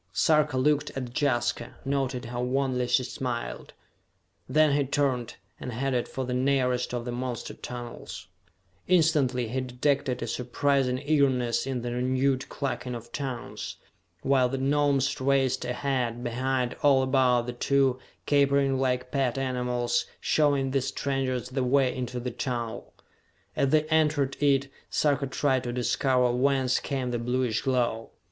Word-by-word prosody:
Sarka 150 -4 +3
looked 145 +2 +2
at 125 -2 -5
Jaska, 120 -4 0
noted 135 -2 -1
how 120 +1 -4
wanly 125 0 0
she 125 +1 +3
smiled. 125 - -5 0.8
Then 155 -2 +4
he 145 - +2
turned, 130 -3 -1 0.2
and 125 - -5
headed 125 +1 -1
for 130 - -4
the 125 - -3
nearest 125 -1 +1
of 120 -1 -3
the 120 - -3
monster 120 -1 -4
tunnels. 120 -1 -8 0.6
Instantly 150 -9 +2
he 130 +3 -1
detected 130 0 -1
a - - -1
surprising 125 +2 0
eagerness 135 -4 +1
in 130 -3 -2
the 120 - -3
renewed 130 +2 0
clucking 130 -3 -3
of 115 0 -9
tongues, 130 -4 -5 0.5
while 130 -2 +3
the 135 - -2
Gnomes 140 0 +1
raced 135 -2 +2
ahead, 125 -1 -1
behind, 125 +1 -1
all 135 -2 +5
about 130 -2 +3
the 125 - -4
two, 135 +1 +2 0.3
capering 140 -2 +3
like 125 -1 0
pet 135 -3 0
animals, 125 -2 0
showing 140 -3 +2
these 135 -1 0
strangers 130 -3 -2
the 130 0 -1
way 130 0 +2
into 125 -1 -4
the 125 +1 -4
tunnel. 120 -2 -4 0.6
As 140 - +2
they 155 +1 +4
entered 150 -4 +2
it, 140 -1 +3 0.2
Sarka 145 -2 +1
tried 130 -1 +1
to 120 - -2
discover 125 +1 +1
whence 130 0 +2
came 130 -3 -3
the 120 - -1
bluish 125 -1 0
glow. 120 -4 0
130 Hz, 145 wpm, -27 LUFS, 125-140 Hz, 0.8 s, all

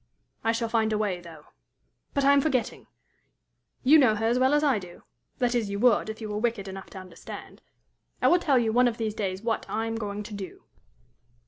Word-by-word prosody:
I 225 - +2
shall 230 0 -1
find 225 -1 +1
a 215 - +1
way, 205 -4 -1
though. 160 -3 -13 0.7
But 280 -1 +2
I 280 - +6
am 280 - +5
forgetting! 265 -5 -1 1.0
you 295 +4 +7
know 240 -6 +4
her 220 +1 -2
as 240 +2 +2
well 260 +3 +4
as 295 - +2
I 270 -7 +3
do 180 -2 -12 0.3
that 245 -1 +1
is, 230 -4 0
you 200 - -3
would, 230 -1 +3
if 220 - -6
you 220 - -5
were 210 0 -2
wicked 225 -4 -1
enough 190 0 -8
to - - -11
understand. 185 -3 -10 0.6
I - - +3
will 355 - +5
tell 285 -6 +2
you 225 -2 +1
one 250 +1 +5
of 230 -1 -2
these 220 -2 -2
days 195 -2 -3
what, 225 -1 -1
I 225 +1 -1
am 225 0 -3
going 210 -1 -4
to 210 - -9
do. 195 -4 -8
225 Hz, 225 wpm, -27 LUFS, 205-245 Hz, 1.0 s, you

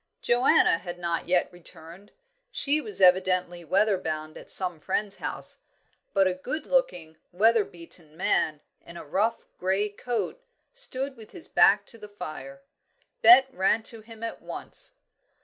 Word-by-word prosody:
Joanna 240 -8 +4
had 175 -1 -7
not 170 -1 -3
yet 180 0 +1
returned; 175 +2 -13 0.4
she 300 - 0
was 420 +3 0
evidently 185 -1 +3
weather 195 +4 +2
bound 155 -2 -5
at - - -12
some 180 -4 +3
friend's 205 +5 -2
house, - - -4 0.5
but 195 -1 +3
a 185 - +1
good 255 +12 -5
looking, - - -1
weather 220 +4 +3
beaten 165 -3 -9
man, 155 -4 0 0.2
in 170 - -11
a - - -9
rough 210 +9 0 0.2
grey 190 +3 0
coat, 240 - -4 0.3
stood 275 - +2
with 220 -3 -14
his - - -10
back 200 +1 +4
to 230 - -3
the 210 - -10
fire. 155 -8 -9 0.6
Bet 255 +4 +7
ran 205 +3 +1
to 225 0 0
him 225 0 -13
at 230 - -5
once. - - -6
195 Hz, 150 wpm, -26 LUFS, 175-230 Hz, 0.6 s, Bet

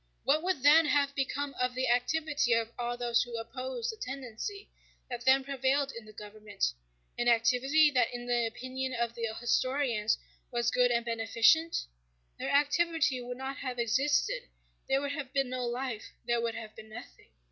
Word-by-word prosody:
What 295 +3 +3
would 355 -6 -1
then 305 +2 +7
have 285 -1 +2
become 280 +1 -2
of 250 0 0
the 260 0 0
activity 250 +1 +1
of 230 0 0
all 240 0 -2
those 240 -1 +2
who 240 -1 -4
opposed 260 - -4
the 445 - -12
tendency 275 - -6 0.4
that 240 -1 -5
then 265 +1 +5
prevailed 275 +1 0
in 230 -3 -9
the 215 - -12
government—an 205 - -5
activity 250 +6 +4
that 250 -4 +2
in 245 0 -6
the 240 -1 +1
opinion 255 +3 -4
of 235 -1 -1
the 230 -1 -2
historians 240 -2 +1 0.3
was 240 0 0
good 250 0 +4
and 235 -1 +1
beneficent? 230 +8 +3 0.5
Their - - -3
activity 295 -1 +2
would 245 0 -6
not 265 +1 -5
have 255 -2 -4
existed: 290 - +1 0.4
there 270 +1 +3
would 285 0 -2
have 280 -3 -5
been 275 -2 +1
no 250 -1 -2
life, 245 -2 -4
there 235 0 +1
would 230 -1 -2
have 220 -1 -8
been 220 0 -12
nothing. 240 +3 -11
250 Hz, 170 wpm, -30 LUFS, 235-280 Hz, 0.5 s, then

